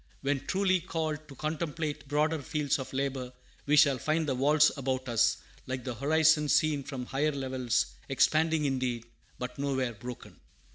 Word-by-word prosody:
When 140 0 0
truly 185 -1 +2
called 155 -3 -3
to 135 - -12
contemplate 155 0 -3
broader 150 +2 +1
fields 145 +1 -1
of 130 - -6
labor, 135 -2 -2 0.4
we 150 - +4
shall 140 -3 +5
find 155 +4 0
the 135 - +1
walls 150 +4 +4
about 130 -2 -2
us, 115 -3 +3 0.3
like 130 -1 -4
the 130 - -3
horizon 150 +4 +3
seen 150 -1 +3
from 130 -2 -6
higher 145 +4 0
levels, 130 -3 -1 0.2
expanding 155 +3 +2
indeed, 130 -4 -1 0.3
but 125 +2 -6
nowhere 130 -3 -1
broken. 120 +3 -9
140 Hz, 155 wpm, -30 LUFS, 130-155 Hz, 0.4 s, shall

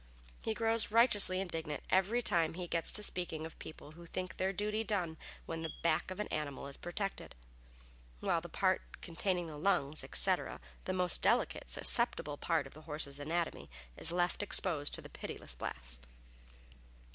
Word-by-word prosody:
He 220 - -1
grows 225 0 +1
righteously 210 -5 +5
indignant 165 -5 -3
every 200 +6 +3
time 165 -4 +3
he 180 0 -4
gets 170 -1 -1
to 210 - +6
speaking 175 -5 +1
of 160 - -10
people 155 -1 -9
who 170 +2 -12
think 185 +2 -4
their 190 +1 +1
duty 210 +3 -1
done 185 -7 0 0.3
when 165 0 -4
the 160 - -3
back 165 +1 +2
of 185 - -6
an 210 - -1
animal 145 -3 -3
is 140 0 -5
protected, 195 +3 -4 0.8
while 165 - +1
the 175 - -8
part 185 +2 +2 0.2
containing 175 +1 -1
the 155 -2 -7
lungs, 155 -4 +1
etc. - - +3 0.3
the - - -1
most 180 -2 +4
delicate, - - +2
susceptible 145 - +2
part 165 -3 +1
of 135 - -10
the 155 - -12
horse's 145 -2 -3
anatomy 165 +4 -2 0.3
is 165 - 0
left 175 +2 +1
exposed 170 -7 0
to - - -9
the - - -8
pitiless - - -6
blast. - - -5
170 Hz, 170 wpm, -35 LUFS, 155-190 Hz, 0.8 s, to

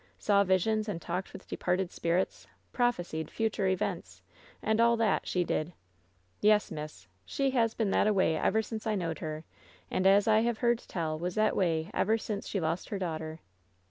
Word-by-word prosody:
Saw 200 -1 +3
visions 210 +3 +1
and 180 -5 -3
talked 180 +3 -4
with - - -11
departed 180 0 -1
spirits, 170 +2 -1 0.3
prophesied 175 -10 -1
future 215 -3 -1
events, 170 - -2 0.4
and 220 +1 +1
all 235 0 +4
that, 225 -3 +1
she 180 - +1
did! 165 0 -2 0.7
Yes, 210 0 +3
miss. 150 -12 -7 0.2
She 275 - -1
has 230 -3 +1
been 215 -4 0
that - - +3
a 215 - +3
way 185 -5 +2
ever 220 +7 +1
since 220 0 -6
I 215 - +1
knowed 165 -5 -2
her, 155 0 -5 0.5
and 185 - +2
as 200 +2 +5
I 220 0 +5
have 235 0 0
heard 235 -1 +2
tell, 155 -7 -3
was 180 +1 -3
that 215 0 +3
a - - -6
way 165 -1 0
ever 220 +3 +2
since 210 -2 -5
she 200 - -2
lost 165 +1 -2
her 205 - -2
daughter." 160 -3 -4
190 Hz, 190 wpm, -30 LUFS, 165-220 Hz, 0.7 s, as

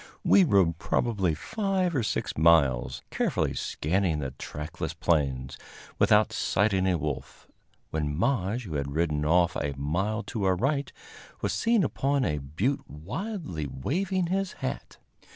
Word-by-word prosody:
We 195 - +6
rode 95 - +3
probably 95 -3 0
five 190 - -1
or 130 - +2
six 105 - -2
miles, 75 -6 +3
carefully - - 0
scanning 85 +1 0
the 70 -3 -3
trackless 80 +1 -6
plains, 70 -7 0 0.4
without - - +4
sighting 95 0 +1
a 90 -2 +2
wolf, 75 -2 -5 0.4
when 75 -2 -2
Maje, 115 - 0
who 90 -8 -7
had 70 0 -3
ridden 75 -3 +1
off 85 +1 +3
a 70 -1 -2
mile 95 +11 -1
to 105 -4 -3
our 95 -1 +3
right, 140 +8 0 0.5
was - - 0
seen 230 -3 +2
upon 140 -2 0
a 75 - 0
butte 80 - -2
wildly 100 - -5
waving 180 - -1
his 190 +2 -1
hat. 130 - -5
90 Hz, 140 wpm, -27 LUFS, -, 0.5 s, We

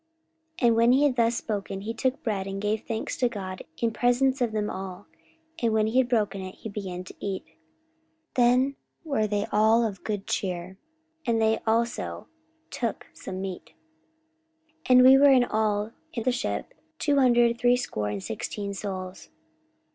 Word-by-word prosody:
44:027:035 240 - +3
And 230 - +4
when 230 +1 +5
he 275 +3 +4
had 285 -4 +3
thus 235 -1 +2
spoken, 200 -4 -4
he 220 +3 -4
took 260 +3 -1
bread, 200 -4 -2
and 195 0 -4
gave 210 +1 -1
thanks 225 -1 -3
to 245 - +2
God 190 -5 -6 0.2
in 230 -1 0
presence 250 +3 +2
of 240 -2 +1
them 210 -1 -1
all: 190 0 -6 0.6
and 230 -2 +2
when 215 -1 +3
he 225 +4 +2
had 255 -1 +2
broken 210 -5 0
it, 185 0 -7
he 220 - -8
began 190 -3 -5
to 185 - -11
eat. 195 -2 -3
44:027:036 160 - -30 0.8
Then 250 +3 +4 0.3
were 275 -9 0
they 205 0 -1
all 220 +2 +4
of 200 -4 -5
good 205 -2 -3
cheer, 185 0 -3 0.5
and 230 -1 +2
they 220 0 +2
also 235 +2 -1 0.5
took 230 -4 -3
some 185 0 -7
meat. 190 -2 -7 1.1
44:027:037 - - -12
And 255 0 +8
we 260 +1 +9
were 285 0 +7
in 255 -2 +6
all 215 -2 0 0.2
in 230 - -3
the 255 - +2
ship 105 - -3 0.2
two 290 -1 +1
hundred 240 -3 +4
threescore 245 - +1
and 100 -2 -4
sixteen 200 - -4
souls. 185 -2 -6
220 Hz, 175 wpm, -26 LUFS, 195-245 Hz, 1.1 s, we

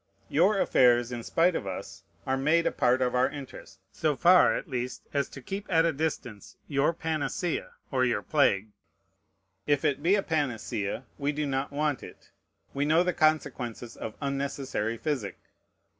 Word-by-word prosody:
Your 195 +7 +3
affairs, 120 -5 +4
in 120 -1 -4
spite 165 +8 +2
of 100 - -3
us, 95 - -6 0.2
are 130 - +1
made 155 +5 +2
a - - +2
part 125 +1 +2
of 125 - 0
our 125 +1 +3
interest, 140 -2 -10
so 155 -2 0
far 180 +6 +6
at - - -4
least 125 -3 -4
as 140 -2 0
to 135 - -11
keep 195 +6 -5
at 165 -1 +4
a 165 - +2
distance 135 -8 -4
your 140 +2 +2
panacea 160 +1 -2 0.2
or 130 -2 +2
your 115 -5 +1
plague. 110 -9 +2 1.0
If 145 -1 +2
it 140 0 +1
be 175 +6 +4
a 200 - 0
panacea, 120 - -2 0.2
we 140 +1 0
do 150 0 -2
not 135 0 -2
want 145 -2 -1
it: - - -13 0.4
we 140 - 0
know 160 +4 +4
the 180 0 0
consequences 135 -7 0
of 110 - -6
unnecessary 135 -5 -2
physic. 130 - -3
140 Hz, 170 wpm, -28 LUFS, 125-155 Hz, 1.0 s, far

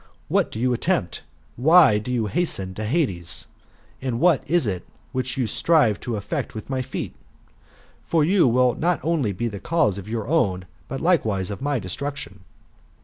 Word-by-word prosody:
What - - +2
do 110 - -6
you 125 +1 +2
attempt? 120 - -1 0.4
Why 150 -4 +6
do 110 +4 -5
you 120 -3 0
hasten 100 - 0
to 110 +3 -4
Hades? 105 - 0 0.6
And 125 -3 -2
what 170 -3 +4
is 175 -3 +3
it 95 -5 -2 0.3
which 130 0 -2
you 130 - +1
strive 120 -1 +2
to 120 - -4
effect 100 +2 -4
with 110 +5 -7
my 130 -1 0
feet? 125 - -5 0.9
For 165 -2 +1
you 175 -1 +4
will 125 +1 +3
not 175 +1 0
only 155 -10 +1
be 115 +5 -2
the 105 -3 -5
cause 150 - +1
of 100 - -10
your 110 -1 -3
own, 100 - +1 0.2
but 135 - -5
likewise 110 - +1
of 100 - -6
my 140 -2 0
destruc 140 +10 -4
tion." 100 -8 -9
125 Hz, 180 wpm, -23 LUFS, 105-150 Hz, 0.9 s, Why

